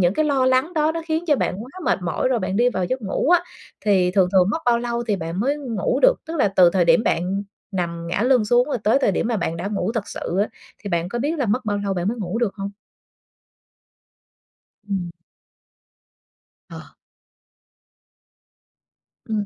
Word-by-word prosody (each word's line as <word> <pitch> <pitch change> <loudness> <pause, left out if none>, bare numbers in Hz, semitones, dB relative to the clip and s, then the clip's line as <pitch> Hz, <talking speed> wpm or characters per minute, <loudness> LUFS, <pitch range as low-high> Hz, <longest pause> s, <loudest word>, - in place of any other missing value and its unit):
những 180 +1 +3
cái 310 - +1
lo 275 -3 +2
lắng 260 +7 +2
đó 310 0 +2
nó 330 - -3
khiến 320 +1 -1
cho 295 -3 +3
bạn - - -1
quá 255 - -13
mệt - - +2
mỏi 175 +8 -1
rồi 255 - +1
bạn 190 -1 -2
đi 245 +2 +4
vào 185 -6 -1
giấc 255 +6 -3
ngủ 205 +8 -1
á, 355 -1 +6 0.4
thì 190 -3 +3
thường 185 -1 +3
thường 185 -2 +5
mất 320 - -1
bao 240 -1 +3
lâu 235 0 -2
thì 210 - +2
bạn 165 +2 -4
mới 280 +5 +1
ngủ 235 -9 -2
được? - - +6
Tức 325 +1 -4
là 260 - +3
từ 180 -2 +7
thời 180 -1 +2
điểm 165 +5 +4
bạn 190 +2 0 0.3
nằm 170 -2 -3
ngả 180 +4 -1
lưng 250 -2 +3
xuống 240 +3 +3
rồi 255 - -1
tới 225 +6 +4
thời 200 - +3
điểm 230 - -1
mà 235 - 0
bạn 165 -3 -2
đã 175 - -4
ngủ 200 +1 -1
thật 225 -4 -3
sự 180 - -4
á, 210 - +1 0.4
thì 200 - -4
bạn 170 0 0
có 240 +5 -3
biết 305 +6 -1
là 265 - 0
mất 210 +5 +1
bao 205 -1 -1
lâu 195 - -1
bạn 180 +1 -1
mới 235 - -2
ngủ 195 +2 -3
được 235 -5 0
hông? 200 -1 -5 2.2
Ừm. 185 -3 -2 1.6
Ờ. - - -11 2.4
Ừm. 215 -2 -1
210 Hz, 205 wpm, -22 LUFS, 185-255 Hz, 2.4 s, từ